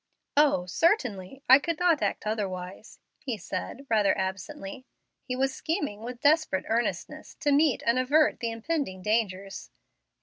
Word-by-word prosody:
"O, 285 Hz, -11 st, +4 dB
certainly, 250 Hz, -, 0 dB
I 260 Hz, +2 st, +9 dB
could 335 Hz, +2 st, -2 dB
not 340 Hz, -4 st, +3 dB
act -, -, -1 dB
otherwise," 195 Hz, -2 st, -4 dB, 0.2 s
he 250 Hz, -6 st, -4 dB
said, 195 Hz, +8 st, -6 dB
rather 215 Hz, -4 st, +2 dB
absently. 195 Hz, +5 st, -5 dB, 0.4 s
He 250 Hz, -, -3 dB
was 265 Hz, +1 st, 0 dB
scheming 295 Hz, -, -3 dB
with 240 Hz, +1 st, -7 dB
desperate 295 Hz, -, +2 dB
earnestness 235 Hz, +2 st, -2 dB
to 290 Hz, -, +2 dB
meet 285 Hz, -2 st, +3 dB
and 235 Hz, +2 st, +3 dB
avert 290 Hz, +4 st, +3 dB
the 235 Hz, -, -2 dB
impending 225 Hz, -, -3 dB
dangers. 200 Hz, -3 st, -2 dB
235 Hz, 140 wpm, -27 LUFS, 195-285 Hz, 0.4 s, I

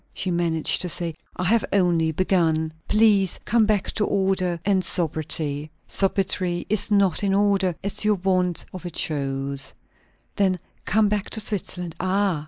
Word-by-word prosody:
she 185 Hz, -, -2 dB
managed 170 Hz, -2 st, 0 dB
to 180 Hz, -, -2 dB
say. 170 Hz, -1 st, 0 dB, 0.2 s
"I -, -, -3 dB
have 220 Hz, +4 st, +3 dB
only 175 Hz, -4 st, +2 dB
begun." 160 Hz, -2 st, +1 dB
"Please 210 Hz, -3 st, +3 dB
come 225 Hz, -1 st, +3 dB
back 210 Hz, -3 st, 0 dB
to 215 Hz, -, -1 dB
order, 190 Hz, -3 st, 0 dB
and 195 Hz, -2 st, +2 dB
sobriety." 155 Hz, -3 st, 0 dB, 0.2 s
"Sobriety 190 Hz, -2 st, 0 dB
is 215 Hz, 0 st, +1 dB
not 200 Hz, -3 st, +2 dB
in 195 Hz, -1 st, +2 dB
order, 195 Hz, -3 st, +2 dB
as 200 Hz, +2 st, 0 dB
your 210 Hz, 0 st, +3 dB
want 180 Hz, -2 st, 0 dB
of 185 Hz, -, -8 dB
it 175 Hz, -3 st, -7 dB
shows." 140 Hz, -2 st, -2 dB, 0.7 s
"Then 190 Hz, -2 st, +2 dB, 0.3 s
come 215 Hz, 0 st, +3 dB
back 205 Hz, -1 st, -1 dB
to 220 Hz, -, +1 dB
Switzerland." 185 Hz, -5 st, -2 dB
"Ah! 190 Hz, -2 st, 0 dB
185 Hz, 155 wpm, -23 LUFS, 165-200 Hz, 0.7 s, have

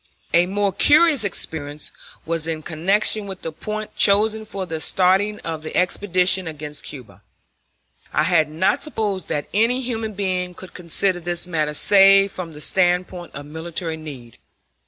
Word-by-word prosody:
A 175 Hz, +1 st, +4 dB
more 200 Hz, 0 st, 0 dB
curious 295 Hz, -, +4 dB
experience 150 Hz, -6 st, -3 dB, 0.3 s
was 165 Hz, -1 st, -1 dB
in 160 Hz, -1 st, -3 dB
connection 200 Hz, +6 st, +1 dB
with 190 Hz, -1 st, -9 dB
the 165 Hz, -, -4 dB
point 215 Hz, +6 st, -6 dB
chosen 215 Hz, +2 st, +3 dB
for 195 Hz, -3 st, -5 dB
the 160 Hz, -3 st, -5 dB
starting 195 Hz, +5 st, +2 dB
of 160 Hz, -2 st, -5 dB
the 155 Hz, -, -5 dB
expedition 185 Hz, 0 st, +2 dB
against 150 Hz, -1 st, -7 dB
Cuba. 130 Hz, -6 st, -10 dB, 0.9 s
I 150 Hz, -, +2 dB
had 160 Hz, -2 st, +2 dB
not 160 Hz, +5 st, 0 dB
supposed 210 Hz, -, -3 dB
that 145 Hz, -, -2 dB
any 230 Hz, +5 st, +2 dB
human 225 Hz, -3 st, -4 dB
being 185 Hz, -2 st, -2 dB
could 185 Hz, -, -12 dB
consider 180 Hz, +1 st, 0 dB
this 175 Hz, 0 st, 0 dB
matter 155 Hz, -4 st, -2 dB
save 195 Hz, +2 st, +6 dB
from 170 Hz, -3 st, -7 dB
the 150 Hz, -, -10 dB
standpoint 180 Hz, 0 st, 0 dB
of 140 Hz, +1 st, -7 dB
military 160 Hz, +2 st, -4 dB
need. 135 Hz, -7 st, -10 dB
180 Hz, 155 wpm, -21 LUFS, 160-200 Hz, 0.9 s, save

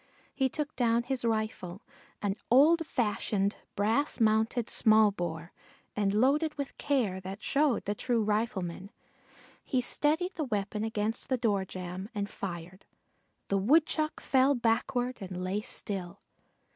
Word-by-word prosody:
He 265 Hz, -1 st, +1 dB
took 300 Hz, +2 st, -3 dB
down 235 Hz, -1 st, +2 dB
his 260 Hz, 0 st, -2 dB
rifle, 215 Hz, -3 st, -2 dB, 0.4 s
an 200 Hz, -1 st, +1 dB, 0.2 s
old 310 Hz, +6 st, +5 dB
fashioned 205 Hz, -4 st, 0 dB, 0.2 s
brass 225 Hz, +10 st, +1 dB
mounted 220 Hz, +1 st, +2 dB
small 215 Hz, -2 st, +5 dB
bore, 170 Hz, -2 st, -5 dB, 0.4 s
and 205 Hz, -2 st, +1 dB
loading 275 Hz, +9 st, +3 dB
with 280 Hz, -1 st, -4 dB
care 240 Hz, -10 st, 0 dB
that 190 Hz, +3 st, -7 dB
showed 280 Hz, -4 st, +2 dB
the 205 Hz, -, 0 dB
true 230 Hz, +1 st, 0 dB
rifleman, 200 Hz, -4 st, -2 dB, 0.7 s
he 260 Hz, -, 0 dB
steadied 310 Hz, +8 st, +1 dB
the 320 Hz, -, -3 dB
weapon 210 Hz, -2 st, -2 dB
against 220 Hz, 0 st, -2 dB
the 260 Hz, -, +2 dB
door 205 Hz, -5 st, +1 dB
jamb 185 Hz, +2 st, -6 dB
and 200 Hz, -1 st, -1 dB
fired. 180 Hz, 0 st, -7 dB, 0.6 s
The 195 Hz, -, +2 dB
Woodchuck 305 Hz, +7 st, +2 dB
fell 270 Hz, +1 st, +3 dB
backward 245 Hz, +2 st, 0 dB
and 180 Hz, -1 st, -5 dB
lay 190 Hz, +3 st, -1 dB
still. 195 Hz, -6 st, -5 dB
220 Hz, 135 wpm, -30 LUFS, 195-260 Hz, 0.7 s, old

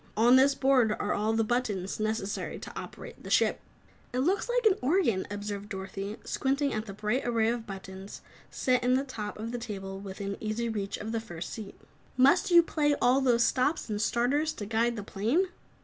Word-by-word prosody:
On 240 Hz, +3 st, +6 dB
this 270 Hz, +1 st, +5 dB
board 265 Hz, -5 st, +3 dB
are 205 Hz, -, -1 dB
all 215 Hz, +2 st, 0 dB
the 225 Hz, 0 st, +2 dB
buttons 215 Hz, -6 st, -1 dB
necessary 215 Hz, -2 st, -2 dB
to -, -, -9 dB
operate -, -, -8 dB
the -, -, -8 dB
ship." -, -, +3 dB, 0.6 s
"Looks 350 Hz, -, +1 dB
like -, -, +1 dB
an 410 Hz, -3 st, +4 dB
organ," 255 Hz, -, +2 dB
observed 205 Hz, 0 st, -5 dB
Dorothy, 195 Hz, +1 st, -5 dB
squinting 275 Hz, +1 st, 0 dB
at 215 Hz, +1 st, -3 dB
the 195 Hz, -, -6 dB
bright 215 Hz, +6 st, -1 dB
array 230 Hz, -2 st, +2 dB
of 230 Hz, -1 st, -3 dB
buttons 190 Hz, 0 st, -8 dB, 0.3 s
set 250 Hz, -1 st, +1 dB
in 250 Hz, +1 st, +3 dB
the 265 Hz, -, +1 dB
top 215 Hz, -6 st, -6 dB
of 225 Hz, +2 st, -5 dB
the 245 Hz, -, -3 dB
table 195 Hz, -4 st, -6 dB
within 200 Hz, 0 st, -5 dB
easy 220 Hz, +2 st, -2 dB
reach 205 Hz, -3 st, -3 dB
of 215 Hz, +2 st, -5 dB
the 225 Hz, -, -1 dB
first 175 Hz, -6 st, -7 dB
seat. 210 Hz, -3 st, -8 dB, 0.4 s
"Must 275 Hz, +10 st, +5 dB
you 345 Hz, -1 st, +8 dB
play 295 Hz, -3 st, +1 dB
all 255 Hz, +3 st, +4 dB
those 240 Hz, -3 st, +4 dB
stops 260 Hz, 0 st, +1 dB
and 210 Hz, 0 st, -1 dB
starters 275 Hz, +8 st, +1 dB
to 205 Hz, -, -6 dB
guide 230 Hz, +3 st, +1 dB
the 210 Hz, -, -5 dB
plane?" 235 Hz, -, 0 dB
225 Hz, 195 wpm, -29 LUFS, 205-260 Hz, 0.6 s, you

